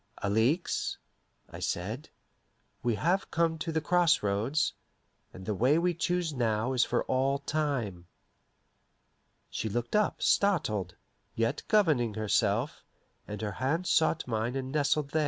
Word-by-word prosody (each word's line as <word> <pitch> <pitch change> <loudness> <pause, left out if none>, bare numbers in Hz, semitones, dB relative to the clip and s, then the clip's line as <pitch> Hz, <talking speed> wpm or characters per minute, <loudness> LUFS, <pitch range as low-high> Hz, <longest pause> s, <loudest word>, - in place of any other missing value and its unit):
"Alixe," 110 - +1 0.5
I - - -8
said, 110 - -3 0.7
"we 120 -1 +1
have 175 - 0
come 165 -1 +1
to 165 - -3
the 160 0 0
cross 175 -3 +3
roads, 105 +10 +1 0.6
and 95 - -11
the 105 - -1
way 125 +9 +3
we 175 +1 +2
choose 170 -1 -1
now 115 -1 0
is 125 -2 +4
for 120 - 0
all 135 +2 +1
time." 140 - -2 1.4
She 110 - -3
looked 120 - -2
up, 210 -1 +2
startled, 110 - +1 0.4
yet 115 +5 0
governing 150 - +3
herself, 110 +3 0 0.4
and 105 0 -6
her 105 - -2
hand 135 - -1
sought 165 -1 +2
mine 115 +1 -1
and 130 -1 -3
nestled 145 0 +1
there. 160 - +1
130 Hz, 140 wpm, -30 LUFS, 110-160 Hz, 1.4 s, is